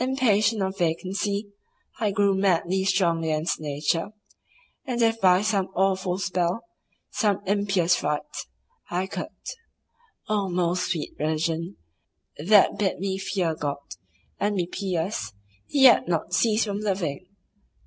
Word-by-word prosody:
Impatient 225 -5 +2
of 190 +1 -3
vacancy, 195 +5 -1 0.5
I 215 -2 +1
grew 200 0 +2
madly 190 -1 +1
strong 175 -4 +2
against 155 +1 -1
Nature, 150 +3 -1 0.7
and 245 -3 -3
if 225 -1 +2
by 185 0 +5
some 200 -3 +1
awful 190 -1 +1
spell, 185 +1 -1 0.5
some 205 -4 +1
impious 195 -3 +2
rite, 150 0 -3 0.4
I 180 +2 -1
could—Oh 435 - -7
most 180 0 0
sweet 165 -4 -3
Religion, 160 +3 -1 0.6
that 195 +6 +4
bid 195 -3 0
me 190 0 -2
fear 190 -4 -1
God, 145 -2 -3 0.6
and 205 0 0
be 180 -3 0
pious, 175 - -3 0.4
and 285 - +1
yet 255 -8 +7
not 170 0 -1
cease 220 +2 +3
from 200 -1 -3
loving! 185 -6 -2
190 Hz, 125 wpm, -25 LUFS, 170-205 Hz, 0.7 s, yet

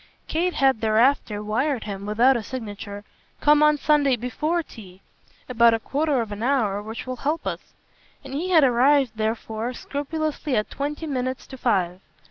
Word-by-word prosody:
Kate 350 +3 -1
had 265 -5 +2
thereafter 220 -1 +2
wired 245 +4 -1
him, 200 -1 -6
without 240 +6 +4
a 235 - -1
signature, 205 -3 -7 0.4
"Come 295 0 +4
on 300 0 +5
Sunday 290 -2 +3
BEFORE 300 +8 -2
tea 190 -9 -13 0.5
about 235 -2 +4
a - - -3
quarter 285 +2 0
of 220 -2 -5
an 205 +1 -6
hour, 230 -6 +1
which 220 +2 -7
will 255 0 -5
help 300 +6 -2
us"; - - -5 0.5
and 270 -1 -9
he 330 +7 -2
had 330 -5 +5
arrived 265 +1 +4
therefore 220 +2 -3
scrupulously 295 0 -3
at 210 -1 -1
twenty 295 +3 -4
minutes 260 -3 -3
to 265 - -10
five. 190 -8 0
255 Hz, 165 wpm, -24 LUFS, 220-290 Hz, 0.5 s, on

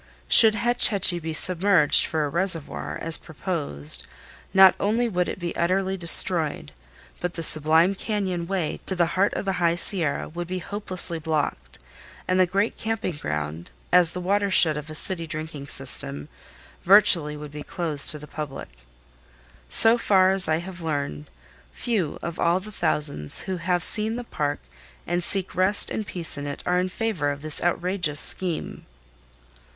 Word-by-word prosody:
Should 220 -2 +7
Hetch 240 +2 +3
Hetchy 185 -4 +1
be 160 -1 -6
submerged 175 -1 +3
for 155 -2 -2
a - - -4
reservoir, 170 -1 -2
as 165 0 +3
proposed, 150 - -3 0.4
not 190 -1 +6
only 225 +4 0
would 180 -5 -2
it - - -6
be 175 -2 -6
utterly 190 +2 -1
destroyed, 170 -2 +3 0.5
but 180 -1 -5
the 165 - -5
sublime 160 +4 +3
cañon 190 -4 -4
way 185 -4 -3
to 190 - +1
the 175 -1 +2
heart 190 +3 +1
of - - -4
the 195 - -1
High 170 0 +2
Sierra 170 -4 -2
would 175 +1 -7
be 185 +1 -4
hopelessly 185 -3 -1
blocked 150 - -4 0.5
and 185 0 0
the 185 - +4
great 200 +5 -1
camping 220 -6 -3
ground, 75 - -5 0.2
as 175 -2 +4
the 180 - -5
watershed 185 -4 +2
of 150 +1 -7
a 155 - -8
city 165 0 -1
drinking 155 -2 -7
system, 70 - -4 0.5
virtually 175 -6 +5
would 150 -1 -10
be 150 0 -8
closed 165 -5 -2
to 155 - -2
the 150 - -11
public. 150 -2 -8 1.0
So 225 - +6
far 190 -4 +3
as 190 -2 -2
I 155 0 +1
have 175 +1 -9
learned, 140 - -4 0.4
few 205 -11 -3
of 170 0 -6
all 170 +2 +1
the 210 +3 -11
thousands 145 - -1
who 190 -1 -5
have 175 0 -2
seen 220 +4 -1
the 245 - -5
park 145 -10 -4 0.4
and 175 +1 -2
seek 190 +1 +2
rest 190 +3 +1
and 215 - -4
peace 165 -5 -3
in 145 - -6
it 145 - -7
are 180 0 +1
in 185 +1 -2
favor 185 -8 -3
of 145 0 -6
this 155 -1 -7
outrageous 175 -3 +1
scheme. 180 -4 +2
175 Hz, 165 wpm, -23 LUFS, 155-190 Hz, 1.0 s, Should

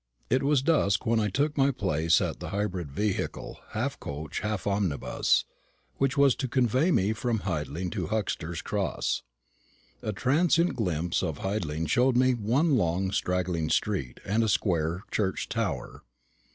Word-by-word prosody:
It 130 +2 +3
was 140 -1 +2
dusk 135 - +2
when 115 0 +2
I 105 -1 +1
took 145 +9 0
my 135 -1 +4
place 85 - +2
in - - -1
the - - -6
hybrid 95 -6 -2
vehicle, 105 +6 -2
half - - -2
coach, 75 +2 -5
half 105 -2 -3
omnibus, 100 -8 +1 0.5
which 135 +1 +1
was 140 -2 +6
to 130 - -2
convey 130 - +2
me 105 - +2
from 115 -1 -1
Hidling 85 0 -3
to 95 -7 -3
Huxter's 90 -5 -2
Cross. 100 -6 -1 0.8
A 110 - -2
transient 165 - +2
glimpse 90 -5 0
at 80 -5 -2
Hidling 80 -6 -2
showed 125 - +3
me 130 0 +4
one 125 +7 +2
long 95 0 0
straggling 90 -4 -1
street 85 -14 -1
and 110 +4 +1
a 110 - +1
square 85 -3 0
church 95 -3 -1
tower. - - -3
100 Hz, 150 wpm, -28 LUFS, 85-125 Hz, 0.8 s, was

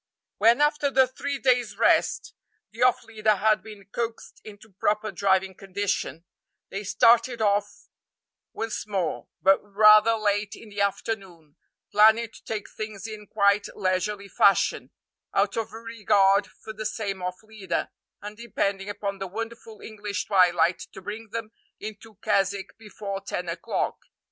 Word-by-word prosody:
When, 230 +6 +5
after 295 -1 +2
the 265 -1 +5
three 280 +2 -4
days' 245 -6 +1
rest, 230 - +2 0.4
the - - -10
off 250 -1 +4
leader 215 -1 +1
had 215 +2 +2
been 210 -3 -12
coaxed 230 -1 -5
into 215 0 -13
proper 215 +1 0
driving 190 0 +1
condition, 190 -4 -3 0.5
they 200 +1 -4
started 230 +4 +4
off 205 -1 0 0.6
once 225 -1 -4
more, 190 -6 -2 0.2
but 195 +1 +6
rather 215 +2 +6
late 205 -1 -1
in 225 - -13
the 205 0 -4
afternoon, 190 -6 -3 0.4
planning 220 +2 +5
to - - -16
take 215 -2 -4
things 215 -2 -7
in 215 -2 -8
quite 200 0 +2
leisurely 200 +2 -1
fashion, 200 0 +3 0.5
out - - +2
of 225 -1 -3
regard 210 -3 +2
for 220 - -11
the 215 0 -3
same 200 -4 -4
off 180 +3 -5
leader, 215 -3 -4 0.3
and 210 +1 -8
depending 200 -4 -2
upon 200 -1 -4
the 195 - -4
wonderful 225 +2 -7
English 210 -2 -5
twilight 175 -3 +3
to 190 - -10
bring 220 +3 -7
them 225 0 -5 0.3
into 215 +1 -9
Keswick 195 0 0
before 205 -2 -6
ten 180 -2 -4
o'clock. 170 0 -2
210 Hz, 145 wpm, -26 LUFS, 195-220 Hz, 0.6 s, but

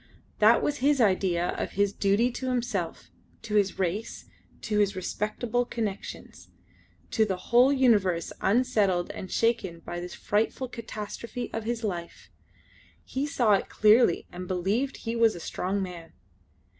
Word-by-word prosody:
That 215 +2 +5
was 295 0 0
his 280 +2 +2
idea 185 -5 +2
of - - -3
his 200 0 +1
duty 205 +6 +2
to 260 +2 -4
himself 235 -9 -3 0.3
to 225 -2 -6
his 200 -2 +2
race 190 +4 -3 0.4
to 210 -1 -1
his 200 -1 +2
respectable 215 +5 -2
connections; 220 -5 -6 0.6
to 220 - +3
the 200 -3 0
whole 240 +8 +4
universe 205 - +2
unsettled 205 -5 +2
and 185 - -7
shaken 220 -8 0
by 175 - -6
this 175 0 -7
frightful 225 +5 -1
catastrophe 230 +1 -6
of 225 -1 -4
his 235 0 -2
life. 175 -5 -5 0.7
He 270 +2 -3
saw 240 -7 +3
it 195 - +1
clearly 215 -3 +4
and 180 +1 -7
believed 200 +10 -1
he 230 +1 -4
was 230 -1 +3
a - - -7
strong 190 +3 -2
man. 175 -3 -8
210 Hz, 145 wpm, -27 LUFS, 185-240 Hz, 0.7 s, That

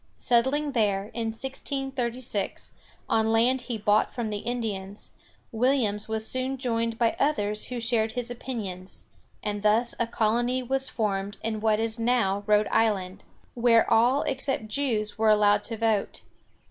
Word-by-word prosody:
Settling 265 +5 +1
there, 205 -4 0
in 230 0 -2
1636, 255 -2 -4 0.4
on 220 0 +2
land 245 +3 +3
he 245 -2 -4
bought 210 0 +2
from 230 -3 -3
the 205 - -2
Indians, 210 -4 -4 0.4
Williams 225 -3 +1
was 220 0 -2
soon 260 +1 -2
joined 230 -3 -1
by 230 -1 +2
others 210 -8 0
who 250 -1 -5
shared 225 -2 0
his 245 -1 -2
opinions, 205 -7 -6 0.4
and 205 -1 -2
thus 220 +3 +2
a 235 - +1
colony 240 +3 0
was 270 +1 0
formed 200 -3 -2
in 220 -1 -2
what 215 -1 +2
is 225 +1 -2
now 225 -4 +1
Rhode 210 0 +4
Island, 195 -4 0 0.3
where 235 -1 +4
all 245 +5 +4
except 265 -4 -1
Jews 220 -5 -1
were 220 0 +4
allowed 205 -1 +4
to 225 - -5
vote. 220 -2 0
225 Hz, 145 wpm, -26 LUFS, 210-245 Hz, 0.4 s, Rhode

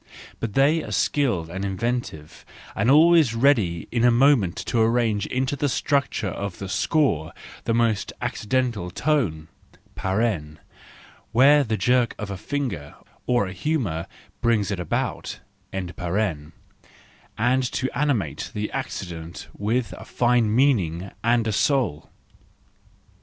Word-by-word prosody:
But 115 -3 -4
they 150 +4 +3
are - - -7
skilled 100 - 0
and 95 +2 -4
inventive, 100 -6 -3 0.3
and 100 +5 +1
always 155 -3 +6
ready 110 - +2
in 115 -1 0
a 125 - +6
moment 120 -7 +4
to 120 - 0
arrange 110 -3 +1
into 130 +2 -1
the 145 0 0
structure 140 -7 0
of 100 -2 -5
the 95 - -6
score 95 - +1 0.3
the 115 - +1
most 115 -3 +1
accidental 115 -5 -1
tone 95 - 0 1.8
(where 140 +5 +6
the 110 -4 -2
jerk 120 +4 +2
of 105 -1 -5
a - - -3
finger 105 - -4 0.3
or 120 -4 +2
a 95 - -6
humour 100 - -2 0.3
brings 110 -4 +1
it 100 - -2
about), 90 - -3 0.3
and 95 -2 -4
to 105 - -3
animate 120 - -1
the 105 0 -3
accident 85 -2 -6
with 115 +3 -1
a - - -9
fine 120 -3 +2
meaning 95 - +1
and 115 0 +2
a 110 - 0
soul. 120 - 0
115 Hz, 125 wpm, -24 LUFS, 95-130 Hz, 1.8 s, always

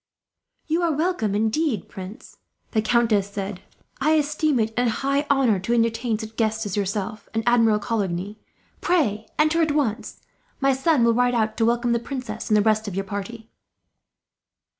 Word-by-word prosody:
"You 325 +3 0
are 340 -1 +2
welcome, 300 - 0
indeed, 220 - 0
prince," 190 +3 -10 0.3
the 220 - +2
countess 220 -3 +2
said. 200 -1 -5 0.4
"I 305 +3 +3
esteem 300 -2 +1
it 220 0 0
a 245 0 +2
high 275 +5 -1
honour 260 -8 +3
to 230 +6 0
entertain 230 0 +1
such 220 0 -8
guests 220 -1 0
as 200 - -3
yourself 205 +1 -3
and 225 - 0
Admiral 230 -3 +4
Coligny. 205 -2 -3 0.4
Pray 235 - +1
enter 310 +2 +3
at 310 -2 +2
once. 260 -8 -2 0.4
My 275 0 +3
son 270 0 +2
will 230 0 +4
ride 245 +1 +2
out 220 -1 0
to 225 - +2
welcome 240 +1 +1
the 235 - +2
princess, 255 +1 -6
and 215 - +4
the 205 - +3
rest 215 0 +2
of 195 - -5
your 195 0 -2
party." 215 +3 -7
230 Hz, 170 wpm, -23 LUFS, 210-270 Hz, 0.4 s, Admiral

